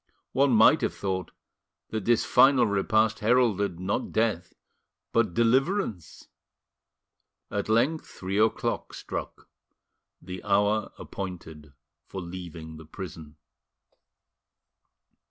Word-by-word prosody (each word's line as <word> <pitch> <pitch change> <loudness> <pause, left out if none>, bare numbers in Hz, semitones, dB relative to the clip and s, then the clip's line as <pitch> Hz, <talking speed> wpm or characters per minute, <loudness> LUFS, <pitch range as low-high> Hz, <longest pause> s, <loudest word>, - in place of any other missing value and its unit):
One 140 0 +3
might 110 -2 +6
have - - -1
thought 95 -4 -3 0.6
that 110 -3 -3
this 120 -1 +3
final 135 -2 +5
repast 110 +1 +1
heralded, 105 -6 +2
not 95 +2 -2
death 110 -6 -1 0.6
but 110 -7 +1
deliverance. 125 - 0 1.2
At 100 +1 -3
length 130 +9 +1
three 95 +2 -4
o'clock 110 +1 0
struck - - -7 0.7
the 90 0 -8
hour 105 +1 +1
appointed 80 -6 -8 0.3
for 95 - -6
leaving 85 -3 -8
the 80 - -12
prison. 80 -4 -9
100 Hz, 100 wpm, -27 LUFS, 90-115 Hz, 1.2 s, might